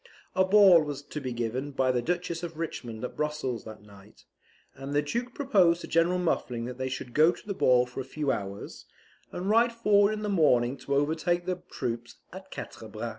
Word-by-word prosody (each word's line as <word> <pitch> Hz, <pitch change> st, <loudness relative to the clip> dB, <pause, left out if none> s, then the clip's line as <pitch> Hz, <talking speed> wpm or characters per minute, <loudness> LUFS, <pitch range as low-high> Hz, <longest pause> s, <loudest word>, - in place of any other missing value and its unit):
A 185 Hz, -, +3 dB
ball 190 Hz, -3 st, +7 dB
was 145 Hz, -2 st, -5 dB
to 150 Hz, +1 st, -7 dB
be 130 Hz, -2 st, -4 dB
given 120 Hz, +4 st, -3 dB
by 130 Hz, -1 st, +2 dB
the 125 Hz, -1 st, 0 dB
Duchess 175 Hz, +2 st, -2 dB
of 170 Hz, -2 st, -6 dB
Richmond 120 Hz, -9 st, -5 dB
at -, -, -7 dB
Brussels 150 Hz, -5 st, -3 dB
that 110 Hz, -2 st, -10 dB
night, 100 Hz, 0 st, -17 dB, 0.5 s
and 135 Hz, +2 st, -6 dB
the 145 Hz, -, +3 dB
Duke 240 Hz, +11 st, -3 dB
proposed 190 Hz, -, +3 dB
to -, -, -7 dB
General 170 Hz, +2 st, +2 dB
Muffling 125 Hz, -9 st, -1 dB
that 125 Hz, +1 st, -7 dB
they 130 Hz, 0 st, -2 dB
should 125 Hz, -2 st, -6 dB
go 155 Hz, +3 st, +5 dB
to -, -, -13 dB
the 205 Hz, -, -3 dB
ball 125 Hz, -8 st, +4 dB
for 125 Hz, +2 st, -8 dB
a -, -, -2 dB
few 140 Hz, +2 st, -2 dB
hours, 100 Hz, -2 st, -6 dB, 0.4 s
and 180 Hz, +2 st, -4 dB
ride 230 Hz, +3 st, +4 dB
forward 210 Hz, -2 st, +3 dB
in 215 Hz, 0 st, -5 dB
the -, -, -2 dB
morning 135 Hz, -10 st, +3 dB
to 140 Hz, +1 st, -3 dB
overtake 160 Hz, +4 st, 0 dB
the 180 Hz, -1 st, -3 dB
troops 120 Hz, -2 st, -4 dB, 0.2 s
at -, -, -10 dB
Quatre -, -, -8 dB
Bras. -, -, -5 dB
150 Hz, 210 wpm, -28 LUFS, 125-180 Hz, 0.5 s, ball